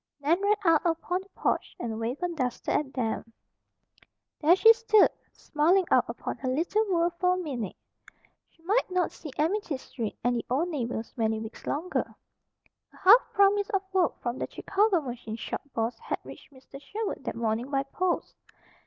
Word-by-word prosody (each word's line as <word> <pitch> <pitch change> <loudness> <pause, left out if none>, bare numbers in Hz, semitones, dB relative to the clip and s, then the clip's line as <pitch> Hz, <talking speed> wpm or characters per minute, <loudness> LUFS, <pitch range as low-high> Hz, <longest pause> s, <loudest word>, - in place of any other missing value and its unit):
Nan 320 +6 +2
ran 410 +1 +3
out 330 -3 +5
upon 350 +2 -1
the 385 - -18
porch - - -1
and 225 -2 -4
waved 240 +7 -3
her 355 - +1
duster 255 -8 -2
at 280 -3 0
them. 230 -2 -2 1.1
There 325 +3 +6
she 450 +4 +8
stood, 455 -2 +4 0.2
smiling 345 +6 +2
out - - +5
upon - - -5
her 260 - -3
little 340 +11 +1
world 340 -1 +2
for 365 0 +3
a - - -3
minute. 260 - -4 0.7
She 325 - -30
might 415 +7 +1
not 365 -2 0
see 315 - -9
Amity 330 -1 0
Street, 230 -4 -6
and 245 +1 +2
the 235 - -3
old 295 +8 +1
neighbors, 240 -7 -4
many 220 -2 0
weeks 220 +1 -9
longer. 325 +6 -2 0.8
A - - -19
half 420 +6 +8
promise 400 0 +4
of 390 -1 0
work 370 -3 +1
from 240 +2 -2
the - - -3
Chicago 395 -3 +1
machine 240 -5 -6
shop 230 - -5
boss 225 0 -1
had - - -3
reached - - -12
Mr. 275 +1 -13
Sherwood 425 +7 -4
that - - -3
morning 230 +2 -1
by 275 -1 +1
post. 350 +6 -2
315 Hz, 180 wpm, -28 LUFS, 245-370 Hz, 1.1 s, she